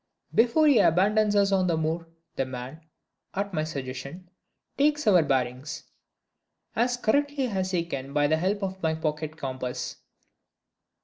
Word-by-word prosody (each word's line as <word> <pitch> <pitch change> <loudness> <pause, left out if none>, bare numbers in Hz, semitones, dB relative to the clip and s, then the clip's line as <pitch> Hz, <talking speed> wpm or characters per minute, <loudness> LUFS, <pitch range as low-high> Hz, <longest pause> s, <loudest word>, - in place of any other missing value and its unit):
Before 245 +7 +4
he 285 -6 +6
abandons 205 +5 +3
us 200 -1 +4
on 190 -2 +2
the 170 -2 +1
moor, 160 +1 -2 0.3
the - - 0
man 130 +4 -7 0.5
(at 200 0 -2
my 155 -2 0
suggestion) 140 +4 -6 0.4
takes 295 +1 +2
our 190 -5 +6
"bearings," 130 -1 -1 0.9
as 245 +1 +1
correctly 285 +4 +1
as 190 -5 -1
he 175 -3 0
can 135 -4 -5
by 145 0 +2
the 155 +2 +3
help 195 +5 -1
of 190 0 -4
my 160 -1 +1
pocket 155 0 -3
compass. 130 -3 -4
170 Hz, 145 wpm, -27 LUFS, 145-205 Hz, 0.9 s, he